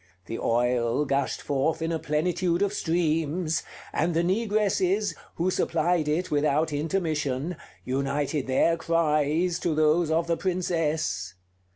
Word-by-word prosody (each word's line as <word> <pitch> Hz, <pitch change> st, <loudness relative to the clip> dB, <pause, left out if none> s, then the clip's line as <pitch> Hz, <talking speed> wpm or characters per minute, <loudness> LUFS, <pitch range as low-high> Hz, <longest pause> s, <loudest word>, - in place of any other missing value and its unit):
The 115 Hz, -, -5 dB
oil 120 Hz, +3 st, +1 dB
gushed 140 Hz, 0 st, -1 dB
forth 145 Hz, +3 st, 0 dB
in 165 Hz, 0 st, -2 dB
a 165 Hz, -, -1 dB
plenitude 170 Hz, +4 st, 0 dB
of 200 Hz, 0 st, 0 dB
streams; 165 Hz, -2 st, 0 dB, 0.3 s
and 165 Hz, +2 st, 0 dB
the 165 Hz, -, +2 dB
negresses, 205 Hz, 0 st, +1 dB, 0.2 s
who 180 Hz, +3 st, 0 dB
supplied 165 Hz, -2 st, +1 dB
it 165 Hz, +5 st, -1 dB
without 150 Hz, +1 st, +1 dB
intermission, 155 Hz, -1 st, -1 dB, 0.3 s
united 140 Hz, +2 st, -1 dB
their 165 Hz, +5 st, +3 dB
cries 165 Hz, +1 st, +1 dB
to 165 Hz, -3 st, 0 dB
those 155 Hz, +2 st, +3 dB
of 165 Hz, +1 st, +2 dB
the 170 Hz, -1 st, 0 dB
Princess. 160 Hz, -, -1 dB
160 Hz, 130 wpm, -26 LUFS, 145-175 Hz, 0.3 s, their